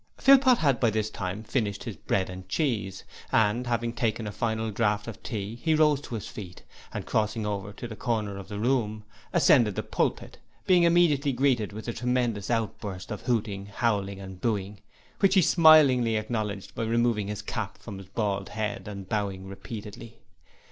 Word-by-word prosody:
Philpot 265 -2 +6
had 140 -5 +2
by 120 - +3
this 110 0 -1
time 100 +2 -4
finished 105 -4 -2
his 115 -5 -5
bread 95 -2 -1
and 95 0 -9
cheese, 105 - -1 0.3
and, 115 +3 +2
having 120 -1 -1
taken 115 -1 -1
a 105 - -4
final 110 +1 -2
draught 105 0 0
of 110 -1 -8
tea, 110 0 -5
he 160 -1 +2
rose 150 -2 +4
to 125 - -6
his 105 - -5
feet, 90 -4 -9 0.3
and - - -5
crossing 110 0 0
over 100 -1 -3
to 120 - -7
the 110 - -8
corner 110 -4 -2
of 95 - -9
the 105 0 -6
room, 110 -2 0 0.3
ascended 105 -5 +4
the - - -2
pulpit, - - -2 0.3
being 180 -2 +5
immediately 170 -5 +4
greeted 125 -5 +1
with 110 +3 -8
a 115 - -2
tremendous 120 -4 -1
outburst 105 -5 -3
of 105 - -4
hooting, 105 -5 -1
howling 100 -2 -1
and 95 -2 -9
booing, 105 -3 -2 0.4
which 195 -1 +4
he 190 - +7
smilingly 145 -9 +6
acknowledged 110 -2 -3
by - - -4
removing 115 -2 +1
his 105 0 -5
cap 110 -1 -4
from 100 -4 -9
his 95 - -11
bald 100 -3 -2
head 105 -1 -3
and 100 -2 -7
bowing 100 -2 -2
repeatedly. 105 +3 -9
110 Hz, 180 wpm, -27 LUFS, 100-120 Hz, 0.4 s, he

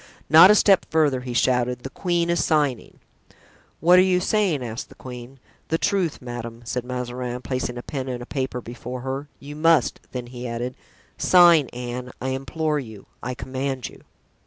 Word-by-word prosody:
"Not 165 +4 +10
a 210 - +7
step 200 -2 +4
further," 150 -5 +2
he 125 -1 -6
shouted, 125 0 +1
"the 135 - -6
queen 170 0 0
is 170 - +1
signing!" 145 -6 0 0.8
"What 180 +2 +6
are - - +8
you 185 -1 +3
saying?" 185 -7 +1
asked 115 +1 -6
the - - -15
queen. 125 +1 -10 0.3
"The 165 - 0
truth, 185 - -1
madame," 120 -1 -7
said 125 +1 -3
Mazarin, 125 0 -5
placing 125 -2 -3
a 120 - -6
pen 135 -2 -5
and 125 -1 -4
a - - -9
paper 130 -2 -3
before 120 +1 -7
her, 135 +3 -4
"you 145 +1 -9
must;" 155 -4 +3
then 125 -1 -5
he 125 0 -7
added: 120 +2 -4 0.5
"Sign, 170 -6 +6
Anne, 125 +1 -6
I 130 - -3
implore 145 +4 -1
you—I 120 +1 -8
command 130 0 -4
you." - - -16
130 Hz, 175 wpm, -23 LUFS, 125-155 Hz, 0.8 s, Not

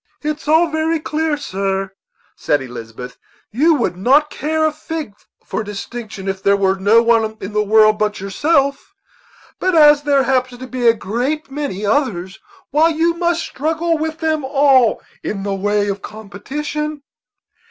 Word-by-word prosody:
"It's 300 0 -4
all 320 +3 +5
very 315 +1 0
clear, 310 0 -1
sir," 195 -7 -3 0.4
said 145 - 0
Elizabeth; 125 -1 -9 0.3
"you 310 +8 +3
would 240 -9 -1
not 275 +11 +3
care 315 +2 -1
a 310 - +2
fig 310 -6 -6 0.3
for 220 - -3
distinction 210 -1 -7
if 190 0 -3
there 200 0 +3
were 190 -1 +2
no 205 +5 +4
one 225 -2 +2
in 200 +2 -7
the 210 - +2
world 215 0 +4
but 210 -1 -1
yourself; 275 - 0 0.6
but 370 -1 +1
as 295 -2 +7
there 285 -2 +2
happens 255 -1 0
to - - -5
be 255 -2 -1
a 230 - +6
great 255 +9 -3
many 270 -9 -4
others, 200 -7 -1 0.3
why, 310 +3 +4
you 330 +1 +1
must 340 0 0
struggle 325 +3 -1
with 315 0 -3
them 315 -2 -1
all 270 -3 +3 0.2
in 195 -2 -4
the 200 0 -2
way 205 +1 0
of 200 0 -3
competition." 290 +8 -5
255 Hz, 160 wpm, -18 LUFS, 205-305 Hz, 0.6 s, as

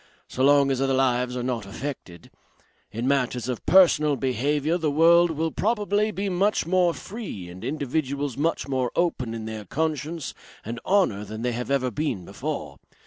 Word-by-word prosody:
So 130 - -2
long 140 0 +5
as 135 0 0
other 135 -1 +2
lives 125 -1 +1
are 125 - -2
not 120 -5 -2
affected. 100 - -7 0.6
In 115 +4 -3
matters 125 -3 0
of 125 -3 -3
personal 155 -6 +5
behaviour 145 +6 0
the 160 -2 0
world 170 +3 +5
will 160 0 -1
probably 210 0 +1
be 200 -1 -3
much 195 +1 +1
more 180 0 +3
free 195 - -7
and 90 +3 -10
individuals 140 0 -2
much 160 +2 -1
more 130 -3 -1
open 130 -10 0
in 110 -1 -6
their 110 -1 -6
conscience 155 - -3 0.3
and 115 +2 -5
honour 185 - +2
than 110 +2 -7
they 125 - 0
have 120 +2 -4
ever 130 -2 +1
been 115 - -2
before. - - -5
140 Hz, 170 wpm, -25 LUFS, 125-165 Hz, 0.6 s, long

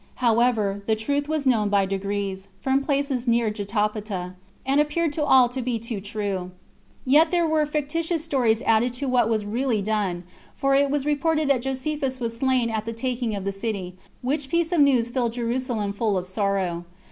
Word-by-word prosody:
However, 225 -4 +2
the 220 - +3
truth 285 +7 -1
was 310 -2 -1
known 220 -5 +3
by 200 -1 +3
degrees, 195 0 -3
from 265 0 +1
the 275 - -7
places 275 -3 0
near 235 -2 +2
Jotapata, 210 -3 -2 0.3
and 275 +2 +3
appeared 300 +1 0
to 300 - -1
all 260 -3 +6
to 255 +1 -4
be 245 -1 -1
too 225 -2 -5
true. 200 -3 -3 0.6
Yet 295 +6 +5
were 335 -3 +2
there 305 - +3
fictitious 315 +2 -1
stories 240 -7 +1
added 230 +2 +2
to 250 +3 -3
what 245 -3 +2
was 215 -2 0
really 230 0 0
done; 200 -4 -1 0.3
for 275 0 +1
it 280 +1 +4
was 285 0 -1
reported 305 0 +1
that 255 -3 +2
Josephus 270 0 -2
was 230 -2 -3
slain 250 -1 +1
at 220 -1 -2
the 230 - -4
taking 240 -2 -2
of 195 -1 -5
the 200 - 0
city, 195 -3 -4 0.3
which 275 +2 -1
piece 335 +2 +1
of 350 - +2
news 255 -5 +4
filled 240 -3 0
Jerusalem 235 -3 -2
full 205 -1 0
of 180 - -3
sorrow. 190 -3 -1
240 Hz, 190 wpm, -24 LUFS, 210-275 Hz, 0.6 s, all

